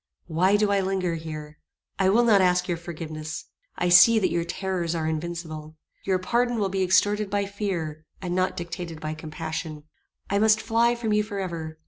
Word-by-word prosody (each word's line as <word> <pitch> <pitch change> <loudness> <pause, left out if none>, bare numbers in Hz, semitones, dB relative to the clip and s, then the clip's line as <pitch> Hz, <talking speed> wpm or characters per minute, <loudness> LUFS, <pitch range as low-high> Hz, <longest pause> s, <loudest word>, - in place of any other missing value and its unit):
"Why 185 +5 +3
do 210 -1 +2
I 200 - +3
linger 190 -2 -1
here? 155 -2 -7 0.4
I 190 -1 +4
will 230 +5 +4
not 215 -4 +5
ask 180 -1 +2
your 175 - 0
forgiveness. 155 -2 -6 0.3
I 180 - 0
see 200 +6 +8
that 210 - +2
your 170 0 0
terrors 175 -1 -2
are 160 -1 -2
invincible. 160 -1 -5 0.3
Your 190 -1 +2
pardon 240 +6 0
will 200 -3 0
be 190 0 -1
extorted 205 +3 +2
by 200 0 0
fear, 180 -7 -4 0.2
and 180 -2 -4
not 185 +1 0
dictated 170 -1 -6
by 155 0 -4
compassion. 155 0 -6 0.4
I 200 - +1
must 220 0 +4
fly 235 +2 +2
from 225 -3 -1
you 210 - +3
forever. 175 -7 -5
180 Hz, 180 wpm, -25 LUFS, 160-200 Hz, 0.4 s, see